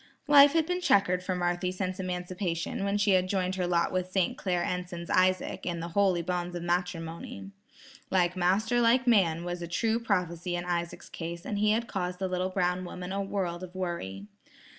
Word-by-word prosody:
Life 285 0 +8
had 325 -1 +3
been 360 +2 -2
checkered 190 - +3
for 185 0 -2
Marthy 175 +1 0
since 185 0 -3
emancipation 180 -1 -3
when 200 +1 +1
she 205 0 +3
had 185 -1 +3
joined 185 -2 0
her 185 -2 -1
lot 170 -1 +1
with 185 0 -2
St.Clair 185 -1 0
Enson's 180 -1 -4
Isaac, 185 0 +2
in 170 -1 -2
the 170 +1 -5
"holy 185 -1 +2
bonds 175 0 -2
of 175 - -4
matrimony." 175 +1 -3 0.6
"Like 180 -1 +2
master 200 +7 +2
like 240 +2 +4
man," 180 -9 +3
was 175 0 -4
a 170 - -4
true 225 +6 0
prophecy 175 -5 -1
in 175 0 -3
Isaac's 170 -1 -3
case, 170 0 -6
and 205 - -2
had 215 +3 +2
caused 180 -2 -3
the 190 0 -2
little 185 0 -1
brown 180 -1 0
woman 180 0 -6
a 200 +1 -1
world 185 -3 -2
of 185 0 -9
worry. 170 - -4
180 Hz, 185 wpm, -29 LUFS, 175-195 Hz, 0.6 s, Life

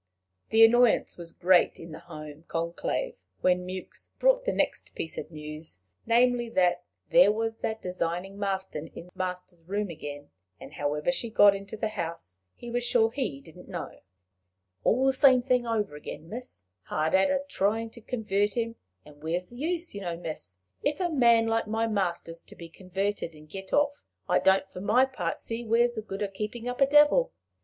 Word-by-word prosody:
The 225 +1 +8
annoyance 240 0 +4
was 170 -1 -6
great 180 0 +3
in 165 0 -9
the 155 - -8
home 155 -1 -10
conclave 170 - -2 0.3
when 180 0 +2
Mewks 185 0 -7
brought - - +3
the - - +2
next - - -1
piece 160 - -4
of - - -6
news 155 - -7 0.3
namely, 240 0 +3
that 180 -4 +2 0.3
there 255 -5 +7
was 225 +1 -2
that 220 0 -3
designing 180 +2 -3
Marston 190 -6 -2
in - - -8
the 180 - -18
master's 180 -1 -5
room 195 +3 -3
again, 145 -2 -8 0.3
and - - -11
however 150 - 0
she 240 -3 -2
got 205 -2 +6
into 200 +2 -7
the 220 0 -1
house 165 - -5 0.2
he 240 - -9
was 245 0 0
sure 230 -2 +3
he 245 - -2
didn't 170 +3 -15
know. 175 -3 -6 0.8
"All 255 +4 +3
the 270 - +4
same 260 -1 +6
thing 250 -2 +1
over 210 -8 -1
again, 150 +2 -8
miss! 230 - -7 0.2
hard 155 +1 -1
at 190 0 +5
it - - +3
a 280 0 -2
tryin' 225 -1 0
to 235 - -11
convert 210 -3 -1
'im! 230 0 -2 0.3
And 145 -1 -16
where's 170 +3 -2
the 240 - -12
use, 335 +4 -2
you 200 - -6
know, 175 -3 -3
miss? 155 - -5 0.3
If 290 +1 0
a 355 -2 0
man 235 -5 +5
like 225 -1 0
my 225 +1 0
master's 175 -6 -2
to - - -16
be 170 -1 -10
converted 190 -1 -3
and 155 0 -15
get 190 +4 -9
off, 285 0 +1 0.2
I - - +3
don't 190 0 +3
for 180 -1 -9
my 230 +6 +4
part 205 -11 -3
see 230 +1 -3
where's 235 +1 +3
the 220 - -4
good 210 -1 -5
o' - - 0
keepin' 210 +4 -5
up 245 +2 -4
a 275 - +7
devil." 295 - +5
205 Hz, 195 wpm, -28 LUFS, 170-240 Hz, 0.8 s, The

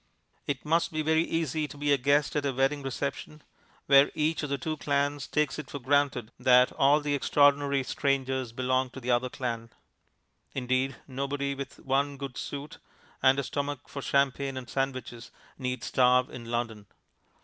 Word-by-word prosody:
It 140 -1 -3
must 165 +2 +2
be 155 -1 -1
very 160 +1 +3
easy 160 -2 -1
to 145 - -11
be 145 0 +2
a - - +4
guest 140 0 +2
at 145 -1 0
a - - +1
wedding 135 +3 +1
reception, 140 +2 -5 0.4
where 140 0 +6
each 155 +1 0
of 150 - -4
the 140 - 0
two 155 +1 -3
clans 145 -1 -1
takes 150 0 0
it 150 - -7
for - - -5
granted 135 -3 +1
that 125 0 +5
all 145 +2 +4
the 145 0 -1
extraordinary 140 0 +3
strangers 130 -2 -1
belong 130 +1 0
to - - -4
the 125 0 -2
other 120 +1 +2
clan. 115 -3 -4 0.9
Indeed, 130 +1 0
nobody 140 +1 -2
with 140 0 -7
one 140 +1 0
good 135 -2 -6
suit, 145 +1 -6 0.4
and 130 0 +5
a 140 - 0
stomach 145 -1 -4
for 140 - -6
champagne 140 0 0
and 125 -2 -6
sandwiches, 130 -4 -3 0.3
need 125 -2 -3
starve 125 0 +3
in 120 - -8
London. 115 -3 -3
140 Hz, 170 wpm, -28 LUFS, 130-145 Hz, 0.9 s, where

